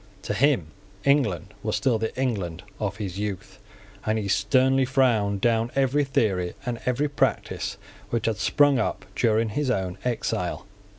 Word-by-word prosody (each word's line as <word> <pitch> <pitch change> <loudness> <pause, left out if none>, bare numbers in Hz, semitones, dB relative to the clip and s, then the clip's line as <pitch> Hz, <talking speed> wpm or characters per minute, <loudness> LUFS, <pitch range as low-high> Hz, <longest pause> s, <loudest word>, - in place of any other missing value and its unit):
To - - -2
him 110 - +2 0.3
England 135 - +2
was - - -1
still 120 -4 +1
the 110 0 -1
England 95 -9 -2 0.2
of 100 -2 -2
his 100 -3 -4
youth; 100 -1 -5 0.4
and 110 +1 0
he 105 -2 -2
sternly 130 +7 +3
frowned 115 -7 +2
down 115 0 +2
every 135 +2 +2
theory 95 -10 0
and 120 -2 -2
every 130 +4 +1
practice 145 - -1 0.3
which 115 -1 -1
had 115 -2 0
sprung 140 +4 +4
up - - -2
during 110 -1 +2
his 140 +5 -1
own 95 -5 -1
exile. 120 -4 -2
110 Hz, 155 wpm, -25 LUFS, 100-130 Hz, 0.4 s, sprung